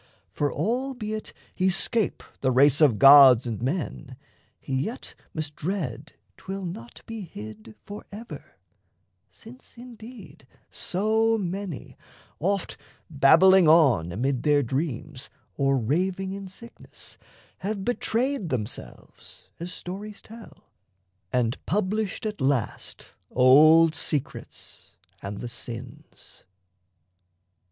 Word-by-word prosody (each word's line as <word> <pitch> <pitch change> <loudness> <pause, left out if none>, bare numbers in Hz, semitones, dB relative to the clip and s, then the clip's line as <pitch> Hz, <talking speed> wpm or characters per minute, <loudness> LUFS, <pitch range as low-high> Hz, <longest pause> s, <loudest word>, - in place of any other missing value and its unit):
For 145 -1 -1
albeit 235 -3 -3 0.2
he 185 0 +1
'scape 205 +2 0 0.2
The 130 - +1
race 140 +3 +4
of 135 -8 +5
gods 135 -3 +8
and 115 -3 -4
men, 135 -2 -4 0.4
he 135 - -7
yet 150 - -3 0.2
must 155 -2 -5
dread 160 - -4 0.2
'Twill 195 0 -6
not 120 -9 -9
be 225 -1 -7
hid 110 - -10
forever 210 +2 -10 0.7
since, 245 +2 -15
indeed, 230 - -12 0.2
So 220 +4 +1
many, 190 -4 -5 0.4
oft 195 +3 -1 0.3
babbling 180 +6 +6
on 135 - +4
amid 125 +6 -1
their 145 -1 +3
dreams 135 +1 -4 0.2
Or 135 -1 +1
raving 180 - -1
in 195 0 -6
sickness, 230 +5 -13 0.4
have 200 0 -4
betrayed 245 - -1
themselves 105 - -7
(As 175 +2 -6
stories 200 +4 -8
tell) 225 0 -15 0.6
and 120 -2 -1
published 210 +3 -1
at 210 -7 -4
last 130 -4 -2 0.2
Old 155 +6 +6
secrets 145 -2 -5 0.3
and 100 0 -6
the 120 - -5
sins. 120 +1 -10
165 Hz, 105 wpm, -25 LUFS, 130-205 Hz, 0.7 s, gods